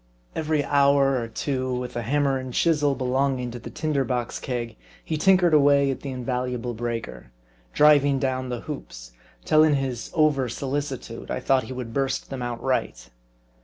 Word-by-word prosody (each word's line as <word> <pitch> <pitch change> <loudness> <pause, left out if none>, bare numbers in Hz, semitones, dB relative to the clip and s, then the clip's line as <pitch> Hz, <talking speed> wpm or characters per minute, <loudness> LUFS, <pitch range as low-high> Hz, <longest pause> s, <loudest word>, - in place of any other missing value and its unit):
Every 155 -2 0
hour 140 -2 +3
or 115 - -4
two 130 +1 -2
with 125 0 -4
the 120 - -3
hammer 135 +2 +1
and 130 -1 -7
chisel 150 -4 +2
belonging 130 -1 0
to 120 - -7
the 120 - -9
tinder 145 +2 -1
box 125 -1 -2
keg, 120 -3 -4 0.3
he - - -2
tinkered 180 +1 +4
away 140 -2 +5
at 135 - -5
the 140 - -6
invaluable 125 -1 -3
breaker; 115 - -5 0.4
driving 145 -2 +5
down 130 -1 -2
the 120 -1 -4
hoops, - - -8 0.3
till 155 0 +5
in 155 -2 +4
his 130 -3 -3
over 150 -5 +2
solicitude, 135 -2 -4
I - - -2
thought 130 0 +2
he 130 - -7
would 125 -3 -6
burst 135 +1 -2
them 135 -2 -4
outright. 120 - -2
130 Hz, 165 wpm, -24 LUFS, 125-145 Hz, 0.4 s, away